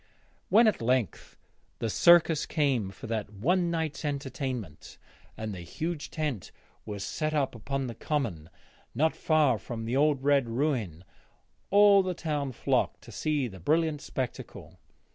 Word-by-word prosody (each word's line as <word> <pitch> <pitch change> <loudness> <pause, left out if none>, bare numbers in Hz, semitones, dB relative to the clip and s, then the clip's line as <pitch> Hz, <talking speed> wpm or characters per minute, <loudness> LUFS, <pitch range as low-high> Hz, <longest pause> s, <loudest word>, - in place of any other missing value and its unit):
When 225 +3 +6
at 215 - +2
length 125 -2 -1 0.4
the 115 - -2
circus 165 +5 +5
came 135 - +1
for 95 - -11
that 110 -2 -3
one 170 - +1
night's 160 -3 -2
entertainment 130 - -5 0.4
and 110 -1 -4
the 95 - -7
huge 155 - -4
tent 145 - -3 0.4
was 100 -2 -5
set 155 +8 -2
up 140 -3 0
upon 135 +4 -3
the 120 - -5
common 110 - -3 0.5
not 160 +6 +2
far 150 -8 +2
from 115 0 -6
the 120 +3 -2
old 145 -1 +2
red 140 -4 +3
ruin, 115 - -1 0.7
all 200 0 +7
the 185 -1 -3
town 150 -5 -2
flocked 120 - 0
to - - -12
see 150 -4 -1
the 95 -4 -10
brilliant 155 - +1
spectacle. 130 -2 -6
140 Hz, 145 wpm, -28 LUFS, 115-155 Hz, 0.7 s, all